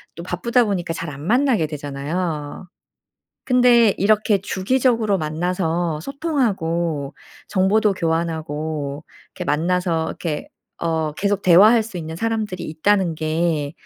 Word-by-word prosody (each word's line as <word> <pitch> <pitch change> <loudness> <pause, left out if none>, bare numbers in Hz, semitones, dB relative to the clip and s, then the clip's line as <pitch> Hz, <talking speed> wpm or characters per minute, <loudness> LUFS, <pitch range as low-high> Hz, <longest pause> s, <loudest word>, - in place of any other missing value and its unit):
또 170 - -7
바쁘다 235 +8 +1
보니까 180 -5 -2
잘 165 0 -5
안 140 -1 -9
만나게 245 - +2
되잖아요. 150 +3 -4 0.8
근데 245 -4 +5
이렇게 210 +1 +3
주기적으로 225 +1 +1
만나서 165 0 -1
소통하고 170 - -1 0.3
정보도 205 +2 +2
교환하고 160 -3 -3 0.3
이렇게 - - -5
만나서 170 +1 0
이렇게 155 -4 -4 0.3
어 160 -2 -1
계속 200 +5 -1
대화할 210 +6 +6
수 215 -3 -9
있는 160 -1 -5
사람들이 215 -3 -2
있다는 175 +2 +1
게 155 -2 -1
175 Hz, 285 characters per minute, -21 LUFS, 160-210 Hz, 0.8 s, 대화할